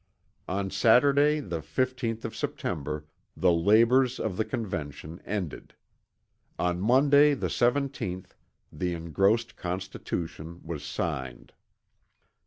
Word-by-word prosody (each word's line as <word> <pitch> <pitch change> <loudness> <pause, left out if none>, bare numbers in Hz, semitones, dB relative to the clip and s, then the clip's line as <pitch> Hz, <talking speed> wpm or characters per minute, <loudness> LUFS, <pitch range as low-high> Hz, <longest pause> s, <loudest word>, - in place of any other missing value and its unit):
On 95 +1 -2
Saturday 140 +6 +4
the 85 - -4
15th 120 - -2
of 115 - -5
September 75 +1 -3 0.3
the 90 -1 +4
labors 115 +9 +4
of 110 -4 -2
the 110 - +1
Convention 85 -7 -5
ended. 95 -7 -4 0.8
On 90 0 0
Monday 140 +6 +5
the - - -2
17th, 120 -8 0 0.4
the 90 +3 -2
engrossed 95 +8 +1
Constitution 85 -2 -5
was 80 -3 -6
signed. 65 -3 -4
95 Hz, 100 wpm, -28 LUFS, 85-125 Hz, 0.8 s, Monday